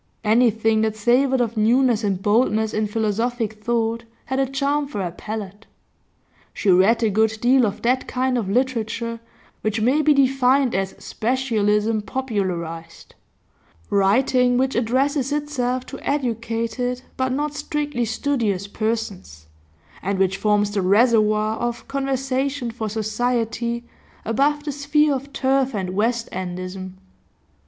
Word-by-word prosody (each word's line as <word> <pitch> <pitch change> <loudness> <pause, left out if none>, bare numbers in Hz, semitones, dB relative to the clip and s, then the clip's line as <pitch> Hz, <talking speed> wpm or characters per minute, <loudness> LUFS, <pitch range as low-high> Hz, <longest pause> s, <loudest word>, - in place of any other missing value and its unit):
Anything 225 -1 +3
that 220 -1 0
savoured 250 +4 +2
of 235 -1 -1
newness 235 +1 +3
and 195 -3 0
boldness 220 +1 +2
in 215 0 0
philosophic 220 +1 -2
thought 230 0 0 0.2
had 265 0 -2
a 270 - +2
charm 280 +2 0
for 270 -7 -5
her 175 - -3
palate. 210 +2 -7 0.9
She 200 - +2
read 205 +6 +4
a 220 - +2
good 220 +2 +2
deal 250 0 +4
of 200 - -6
that 255 +2 +1
kind 255 0 0
of 220 -6 -1
literature 230 -1 -1 0.4
which 215 +1 -1
may 255 +7 +3
be 300 -1 +4
defined 270 -1 +3
as 190 0 -2
specialism 220 -3 0
popularised; 185 -10 -4 0.8
writing 245 +5 +3
which 265 +1 +1
addresses 265 +4 0
itself 255 -4 -1
to - - -8
educated, 240 -1 -2
but 260 0 -1
not 295 +3 -1
strictly 295 -4 -2
studious, 225 -5 -1
persons, 205 - -4 0.6
and 195 +1 -1
which 190 0 +2
forms 210 -1 +1
the 205 -1 0
reservoir 215 +1 +3
of 240 0 -3
conversation 270 -1 -1
for 225 -2 -4
society 235 +2 -1 0.4
above 285 +6 +1
the 295 - -3
sphere 290 +1 +2
of 275 +1 -5
turf 270 -2 +1
and 185 -2 -2
west 230 +4 0
endism. 185 +1 -5
230 Hz, 130 wpm, -22 LUFS, 210-260 Hz, 0.9 s, read